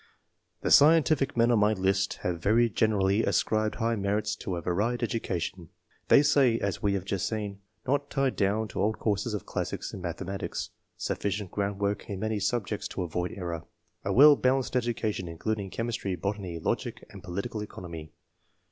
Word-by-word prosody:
The - - -1
scientific 155 -3 +5
men 120 +1 +4
on 115 - +4
my 105 +1 +4
list 95 0 +1
have 85 -2 -2
very 115 +4 +3
generally 100 0 +2
ascribed 110 -1 +1
high 115 +1 0
merits 105 +1 -1
to 95 -4 -4
a 85 - -4
varied 105 +8 0
edu 115 -1 -1
cation. 85 -1 -4 0.4
They 140 - +7
say, 140 -5 +4
as 100 -4 -2
we 100 -1 +1
have 95 -2 -3
just 100 -2 -1
seen: 105 -3 -4
— 110 - -45
"Not 145 +2 0
tied 135 -2 0
down 105 +2 +1
to - - -3
old 110 +2 +1
courses 105 +1 -1
of 100 - -5
classics - - -4
and - - -6
mathematics.*' 90 +2 -4
— - - -49
" - - -46
Sufficient 100 -2 -2
groundwork 100 +2 -2
in 100 -2 -4
many 110 0 -1
subjects 105 -1 -1
to - - -4
avoid 90 +1 -2
error/' 85 -3 -5
— - - -44
" - - -46
A - - -1
well 145 +3 +8
balanced 130 -1 +1
education, 115 -6 -1
including 100 +4 -3
chemistry, 115 -3 -2
botany, 95 -1 -3
logic, 80 - -3
and - - -10
political 100 +5 -4
economy." 85 -6 -8
105 Hz, 185 wpm, -28 LUFS, 95-115 Hz, 0.4 s, well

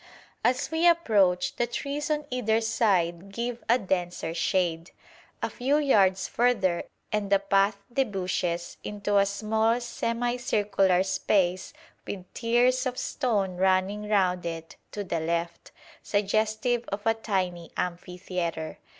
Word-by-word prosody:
As 255 +4 +1
we 325 +2 +3
approach, 200 - +3
the 240 - +1
trees 285 +4 -3
on 300 -1 0
either 225 -3 +1
side 195 -5 +1
give 235 +2 -4
a 240 - +6
denser 175 -5 -2
shade. 170 -1 0 0.5
A - - 0
few 270 +4 +1
yards 195 -10 +3
further 215 -8 +1 0.3
and 210 -2 -1
the 200 - +7
path 200 +1 +2 0.2
debouches 180 -8 -1
into 205 0 -1
a 200 0 +4
small 220 +3 +1
semicircular 230 -6 +1
space 190 -1 0 0.4
with 185 -3 -5
tiers 250 +2 +2
of 250 0 -4
stone 205 -9 -1
running 190 +3 +1
round 185 -4 +2
it 165 -1 -6 0.2
to 205 - -4
the 170 -3 -2
left, 170 +1 -3 0.3
suggestive 220 +4 0
of 200 +1 -4
a 225 - +4
tiny 185 -6 -2
amphitheatre. 180 -2 -4
200 Hz, 125 wpm, -27 LUFS, 180-235 Hz, 0.5 s, the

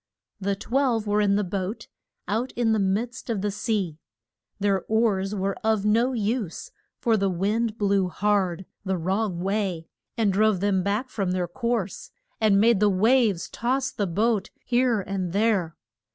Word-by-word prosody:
The 200 0 -1
twelve 235 +1 0
were 210 0 +2
in 200 -1 +3
the 205 - +1
boat, 190 +3 -4 0.4
out 230 +5 -1
in 235 -2 +1
the 220 - +2
midst 220 +6 -1
of 220 -4 -1
the 205 0 -1
sea. 200 -6 -2 0.6
Their 195 -2 +1
oars 210 -3 +1
were 195 0 -1
of 220 -2 +1
no 230 +5 +3
use, 225 - -2 0.3
for 225 -2 +2
the 195 -1 +1
wind 210 +5 0
blew 200 -3 +2
hard 190 -1 0 0.2
the 190 -1 -1
wrong 185 +1 -1
way, 190 -4 -2 0.3
and 210 -4 +2
drove 215 -1 +3
them 195 -1 +1
back 210 +7 -1
from 195 -4 -1
their 180 -1 -1
course, 230 0 -3 0.3
and 210 -3 +4
made 225 -1 +4
the 210 0 +4
waves 210 -1 +3
toss 260 +3 -1
the 205 - -2
boat 210 +3 0 0.2
here 240 -3 +2
and 185 -3 -3
there. 200 -6 +1
205 Hz, 165 wpm, -25 LUFS, 190-225 Hz, 0.6 s, and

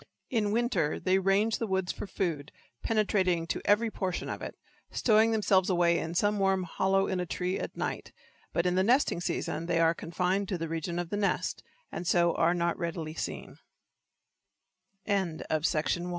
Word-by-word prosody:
In 220 -4 +1
winter 215 - 0
they 190 +1 +2
range 195 +4 +2
the 230 - -1
woods 190 -2 0
for - - -7
food, 160 -7 -3 0.3
penetrating 190 -6 +1
to - - -3
every 220 +2 +3
portion 185 -4 -3
of - - -5
it, - - -6 0.3
stowing 220 -1 +3
themselves 200 -4 +2
away 175 -2 +3
in 165 +1 -4
some 205 +3 +2
warm 195 -1 +2
hollow 190 +2 +1
in 190 - -2
a 180 - -1
tree 180 +2 -2
at - - -6
night, - - -3 0.4
but 170 - 0
in 180 - +2
the 185 - +3
nesting 240 -5 +2
season 170 -1 -2
they 170 -1 +1
are 165 0 +4
confined 180 +4 -1
to 185 - -1
the 165 0 -3
region 165 +2 -3
of 175 -1 -3
the 205 - -1
nest, 205 -1 -1 0.3
and 175 - -5
so 170 0 +3
are 170 +2 +2
not 170 0 0
readily 165 -2 -3
seen. - - -6
185 Hz, 170 wpm, -29 LUFS, 170-205 Hz, 0.4 s, are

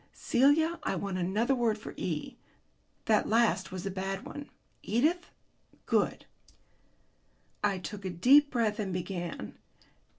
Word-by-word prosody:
Celia, 315 +6 +3
I - - -1
want 195 -2 -3
another 210 +9 +1
word 235 -4 +1
for 210 - -9
E. 160 -4 -4 0.7
That 215 -2 +2
last 230 -1 +2
was 185 0 -6
a 195 - -2
bad 195 +1 -4
one." 290 -1 -8 0.3
"Edith?" 310 +11 +1 0.6
"Good." - - 0 1.4
I 200 -2 +2
took 200 +2 -7
a - - -1
deep 265 - +5
breath 225 -5 0
and 200 -3 -2
began. 175 - -5
210 Hz, 130 wpm, -30 LUFS, 185-250 Hz, 1.4 s, deep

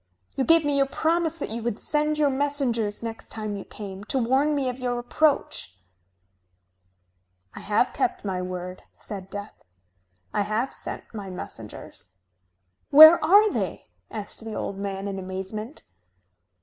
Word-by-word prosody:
You 265 - +1
gave 330 -2 +5
me 290 -1 +1
your 275 0 +3
promise 330 +2 0
that 285 - -5
you 230 +1 -4
would 230 -2 -2
send 300 0 +1
your 295 -2 +3
messengers, 265 -7 0
next 225 -1 -6
time 215 -2 -4
you 195 - -6
came, 195 -2 -8
to 265 - -1
warn 265 +5 +2
me 275 -2 0
of 250 0 -3
your 245 -1 -1
approach." 240 - 0 1.8
"I - - -8
have - - +1
kept - - -1
my 185 -2 -2
word," 180 0 -5
said 195 -2 -7
Death. 205 +1 -7 0.8
"I - - +1
have 215 +5 -1
sent - - -6
my 200 -3 -6
messengers." 95 - -8 0.7
"Where 315 +3 +10
are 405 +6 +6
they?" - - -3 0.2
asked 210 +1 -5
the 220 -1 -6
old 195 - -4
man 195 0 -4
in 195 -1 -4
amazement. 190 +6 -6
230 Hz, 150 wpm, -25 LUFS, 200-285 Hz, 1.8 s, Where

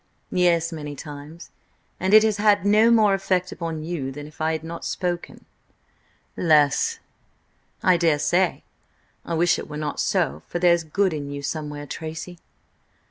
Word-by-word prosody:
"Yes–many 165 -4 0
times. 150 +4 -10 0.5
And 190 +3 +3
it 215 - +8
has 215 -2 +1
had 205 -2 +3
no 215 +3 +5
more 215 -4 +5
effect 185 -2 0
upon 165 -2 -5
you 155 -5 -4
than 145 +2 -8
if 155 +1 -13
I 160 +1 +1
had 160 -1 -4
not 165 +1 -7
spoken." 175 -1 -4 0.9
"Less." 155 - +3 0.9
"I 185 -4 +5
daresay. 170 +2 +1 0.6
I 170 - -5
wish 175 +1 +2
it - - -8
were 150 - -6
not 150 -1 -4
so, 75 +3 0
for - - -3
there's 170 -1 +3
good 185 +3 0
in 145 -2 -5
you 140 0 -6
somewhere, 150 0 -4
Tracy." 160 +4 -7
165 Hz, 150 wpm, -23 LUFS, 150-185 Hz, 0.9 s, it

